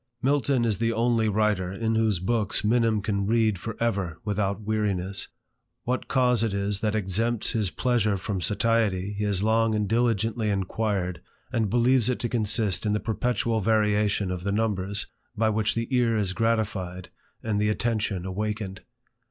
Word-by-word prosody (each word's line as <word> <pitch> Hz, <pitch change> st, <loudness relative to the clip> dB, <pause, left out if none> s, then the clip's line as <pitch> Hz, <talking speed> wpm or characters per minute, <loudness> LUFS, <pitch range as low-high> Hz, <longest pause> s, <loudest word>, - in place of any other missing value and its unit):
Milton 135 Hz, -2 st, +2 dB
is 110 Hz, -3 st, 0 dB
the 115 Hz, 0 st, +1 dB
only 115 Hz, -1 st, +2 dB
writer 105 Hz, -3 st, +1 dB
in 110 Hz, +3 st, -1 dB
whose 110 Hz, -3 st, +2 dB
books 105 Hz, +4 st, -1 dB
Minim 110 Hz, -1 st, +2 dB
can 100 Hz, -2 st, -1 dB
read 110 Hz, -3 st, +2 dB
for 115 Hz, +4 st, -6 dB
ever 95 Hz, -8 st, -1 dB
without 100 Hz, -1 st, -1 dB
weariness. 100 Hz, -3 st, -1 dB, 0.6 s
What 125 Hz, +1 st, -2 dB
cause 125 Hz, -3 st, +3 dB
it 110 Hz, -3 st, 0 dB
is 100 Hz, 0 st, 0 dB
that 110 Hz, 0 st, 0 dB
exempts 110 Hz, +3 st, 0 dB
this 110 Hz, -4 st, +1 dB
pleasure 110 Hz, +3 st, +1 dB
from 95 Hz, 0 st, -3 dB
satiety 105 Hz, -1 st, +1 dB
he 105 Hz, +1 st, -2 dB
has 100 Hz, -1 st, 0 dB
long 110 Hz, 0 st, +2 dB
and 105 Hz, -1 st, 0 dB
diligently 115 Hz, -1 st, +1 dB
inquired, 95 Hz, -2 st, -1 dB, 0.3 s
and 110 Hz, -3 st, +1 dB
believes 120 Hz, +1 st, +3 dB
it 125 Hz, -, 0 dB
to 120 Hz, -, -1 dB
consist 110 Hz, -3 st, 0 dB
in 105 Hz, -1 st, +1 dB
the 105 Hz, -, +1 dB
perpetual 115 Hz, +1 st, 0 dB
variation 105 Hz, -2 st, +1 dB
of 90 Hz, -1 st, -4 dB
the 100 Hz, -, -1 dB
numbers, 100 Hz, -2 st, -1 dB, 0.3 s
by 110 Hz, 0 st, +2 dB
which 105 Hz, 0 st, 0 dB
the 115 Hz, 0 st, -1 dB
ear 115 Hz, -2 st, +2 dB
is 100 Hz, -3 st, 0 dB
gratified 100 Hz, -5 st, -1 dB, 0.3 s
and 105 Hz, -2 st, 0 dB
the 105 Hz, -, +2 dB
attention 105 Hz, -4 st, -1 dB
awakened. 100 Hz, 0 st, -3 dB
105 Hz, 165 wpm, -26 LUFS, 100-115 Hz, 0.6 s, cause